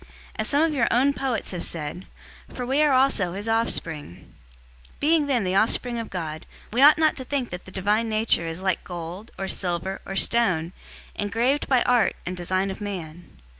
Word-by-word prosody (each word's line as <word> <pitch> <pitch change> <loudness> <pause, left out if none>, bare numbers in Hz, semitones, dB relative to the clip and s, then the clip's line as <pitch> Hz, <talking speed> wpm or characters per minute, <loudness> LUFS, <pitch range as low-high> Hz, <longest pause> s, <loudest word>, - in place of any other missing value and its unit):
As - - -1
some 290 +2 +2
of 325 -1 +1
your 260 -4 +2
own 270 +4 +3
poets 265 -5 -2
have 180 -2 -3
said, 165 +3 -5 0.4
'For 250 - -5
we 270 +4 +2
are 300 -1 +4
also 255 -9 +3
his 205 +3 -5
offspring.' 165 - -2 0.6
017:029 - - -28
Being 305 0 +3
then 250 -6 +1
the 185 0 -1
offspring 235 +4 +1
of 230 - -5
God, 160 -4 -5 0.3
we 245 - +2
ought 295 +2 +8
not 315 -1 +3
to 260 - -4
think 260 -2 -2
that 180 0 -7
the 185 - -11
Divine 210 +4 0
Nature 215 -6 +1
is 165 +2 -5
like 190 -1 0
gold, 175 +5 -7
or 195 - -3
silver, 185 0 -2
or 195 - -6
stone, 185 -7 +2 0.4
engraved 235 +7 0
by 255 -3 +3
art 245 -2 +3
and 180 - -3
design 185 +2 -1
of 190 - -8
man. 175 -5 -6
205 Hz, 195 wpm, -24 LUFS, 180-255 Hz, 0.6 s, ought